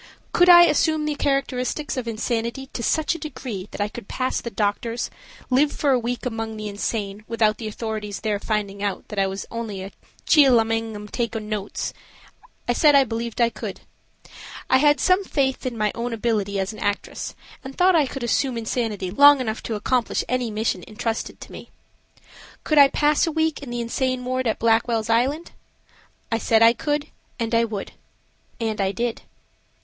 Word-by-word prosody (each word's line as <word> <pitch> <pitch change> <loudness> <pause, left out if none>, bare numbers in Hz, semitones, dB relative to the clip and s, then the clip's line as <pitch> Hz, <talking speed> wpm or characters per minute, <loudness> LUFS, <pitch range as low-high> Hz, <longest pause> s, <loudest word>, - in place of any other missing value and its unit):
Could 355 +1 +5
I 345 0 +10
assume 315 -1 +2
the 300 - 0
characteristics 275 0 -1
of 255 -3 -4
insanity 235 +3 -3
to - - -4
such 310 +7 +1
a 335 - -7
degree 245 - -6
that - - -9
I 205 - +1
could 210 -1 -10
pass 255 0 -2
the 235 - -5
doctors, 230 +2 -2 0.4
live 285 +4 +4
for 285 - 0
a 255 - +3
week 245 +2 -3
among 225 -2 -3
the 215 0 -5
insane 205 0 -3
without 220 -2 +1
the 225 - -4
authorities 215 -2 -5
there 210 -2 -1
finding 200 -2 -2
out 205 -2 -3
that 210 - -3
I 195 - +3
was 195 +1 -5
only 220 -5 -5
a 195 - -8 0.3
"chiel 275 -7 +6
amang 225 0 -1
'em 210 0 -8
takin' 225 -1 -3
notes?" 210 -2 -3 0.7
I 245 - +2
said 295 +3 +5
I 275 - +7
believed 230 -1 -4
I 235 -1 +3
could. 220 - -7 0.9
I 260 - +7
had 295 +1 +4
some 370 +2 +3
faith 265 -7 -1
in 240 -2 -4
my 210 -1 +1
own 235 0 -3
ability 210 -3 -1
as 190 +3 -2
an - - -10
actress 205 0 -3 0.3
and 265 0 -9
thought 365 0 +5
I 300 -4 +4
could 270 -1 -6
assume 245 +1 0
insanity 220 -5 -2
long 285 +6 +7
enough 225 -3 -3
to 225 - -4
accomplish 240 +3 0
any 250 -1 -1
mission 215 -4 -2
intrusted 225 +1 -4
to - - -10
me. - - -10 0.9
Could 305 -1 +3
I 280 - +9
pass 295 +3 +2
a - - 0
week 320 -1 0
in 280 - -8
the 240 0 -3
insane 255 +2 -1
ward 255 0 -1
at 220 - 0
Blackwell's 225 0 +1
Island? 275 +9 +1 0.8
I 225 - +1
said 225 0 +3
I 230 +1 +7
could 295 +4 -2 0.3
and 230 0 -2
I 230 0 +4
would. 215 -3 -5 0.7
And 220 -3 -1
I 190 0 +1
did. 235 0 -2
235 Hz, 190 wpm, -23 LUFS, 215-265 Hz, 0.9 s, I